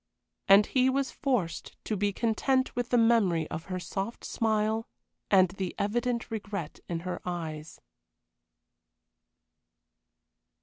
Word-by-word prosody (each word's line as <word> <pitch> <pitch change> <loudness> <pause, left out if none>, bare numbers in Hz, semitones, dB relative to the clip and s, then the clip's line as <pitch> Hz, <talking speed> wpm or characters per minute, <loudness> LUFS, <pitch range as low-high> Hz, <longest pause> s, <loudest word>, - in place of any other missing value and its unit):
And 200 +2 +8
he 260 0 +3
was 270 0 0
forced 245 - -2
to 215 - -2
be 205 +1 +1
content 250 +5 +1
with 245 0 -2
the 245 - +3
memory 210 -9 +3
of 160 +1 -5
her 185 -1 -4
soft 195 +5 -4
smile 220 0 0 0.4
and 185 -2 +6
the 190 0 -4
evident 235 +3 -1
regret 200 -7 -5
in 170 -1 -2
her 180 +1 -4
eyes. 160 -3 -5
205 Hz, 120 wpm, -29 LUFS, 180-235 Hz, 0.4 s, And